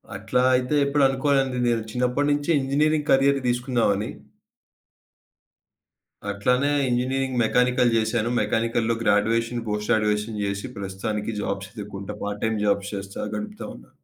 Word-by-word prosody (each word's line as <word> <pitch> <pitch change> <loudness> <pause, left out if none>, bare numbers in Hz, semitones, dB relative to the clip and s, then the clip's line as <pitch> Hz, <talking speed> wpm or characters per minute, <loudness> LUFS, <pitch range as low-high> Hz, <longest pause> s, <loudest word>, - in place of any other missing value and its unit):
అట్లా 110 +5 0
అయితే 125 +3 0
ఎప్పుడు 140 0 +2
అనుకో‌లే‌దండి. 135 -1 +1
నేను 115 -1 +1
చిన్నప్పటినుంచే 145 +5 0
ఇంజినీరింగ్ 150 +3 +1
కరియర్ 135 +1 +4
దీసుకుందామని. 120 -4 0 2.2
అట్లనే 125 +7 +1 0.2
ఇంజినీరింగ్ 130 +1 -1
మెకానికల్ 125 +1 +2
జేశాను. 115 +1 +1
మెకానికల్‌లో 115 +1 0
గ్రాడ్యుయేషన్, 115 +3 +1
పోస్ట్ 105 0 -3
గ్రాడ్యుయేషన్ 105 -1 0
జేసి, 100 +1 -3
ప్రస్తుతానికి 105 +3 -4
జాబ్స్ 100 -1 -3
ఎతుక్కుం‌ట, 105 -1 -7
పార్ట్ 105 0 -4
టైమ్ 110 -1 0
జాబ్స్ 100 0 0
జేస్తా 100 +1 -5
గడుపుతావు‌న్నా. - - -7
115 Hz, 110 wpm, -24 LUFS, 105-130 Hz, 2.2 s, కరియర్